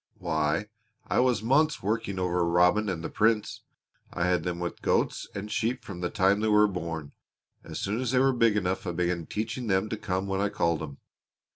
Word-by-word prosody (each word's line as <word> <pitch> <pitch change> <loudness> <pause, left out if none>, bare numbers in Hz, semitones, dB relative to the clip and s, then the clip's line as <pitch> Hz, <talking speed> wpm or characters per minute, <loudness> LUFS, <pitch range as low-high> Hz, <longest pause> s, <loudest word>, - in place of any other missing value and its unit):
Why, 80 +1 0 0.4
I - - +1
was 125 -3 +2
months 150 +4 +2
working 105 -1 -1
over 90 -1 +1
Robin 90 +5 +3
and 85 -3 -3
the - - -3
Prince. 110 -1 +1 0.5
I 85 - -1
had 90 -2 +2
them 90 0 -2
with 85 0 -4
goats - - 0
and 100 +2 -5
sheep 120 +3 -1
from 90 -3 -7
the 90 - -1
time 100 0 +2
they 110 - 0
were 105 0 +5
born. 85 -6 -5 0.5
As - - -7
soon 105 +5 -1
as 130 - -1
they 130 - +1
were 135 +1 +4
big 115 -3 +3
enough 95 0 -1
I 85 - -2
began 85 -1 -1
teaching 110 +3 -3
them 95 +1 +1
to 110 - -3
come 95 -2 -2
when 95 0 -1
I 100 - +1
called 85 -4 0
'em. 70 -3 -7
95 Hz, 210 wpm, -28 LUFS, 90-110 Hz, 0.5 s, were